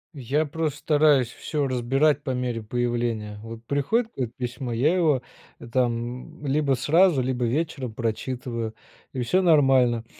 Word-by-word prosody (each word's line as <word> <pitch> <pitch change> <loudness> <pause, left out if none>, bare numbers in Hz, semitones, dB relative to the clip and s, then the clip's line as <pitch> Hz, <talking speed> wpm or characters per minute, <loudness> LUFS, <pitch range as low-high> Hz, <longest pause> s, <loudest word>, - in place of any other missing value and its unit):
Я 140 +4 0
просто 150 -1 -3
стараюсь 145 -5 +3
всё 145 +3 -3
разбирать 135 +4 +2
по 130 - -3
мере 125 -2 -2
появления. 115 -2 -2
Вот 115 +1 -9
приходит 220 - 0
как 125 -4 -2
письмо, 125 0 -4
я 145 +10 +2
его 150 -8 +2 0.5
там, 120 0 -2
м, - - -6
либо 140 0 +2
сразу, 155 +5 +4
либо 125 -1 -1
вечером 135 -2 -2
прочитываю 115 0 -3 0.4
и 130 - -3
всё 180 +11 +2
нормально. 135 -8 +4
130 Hz, 140 wpm, -25 LUFS, 120-150 Hz, 0.5 s, сразу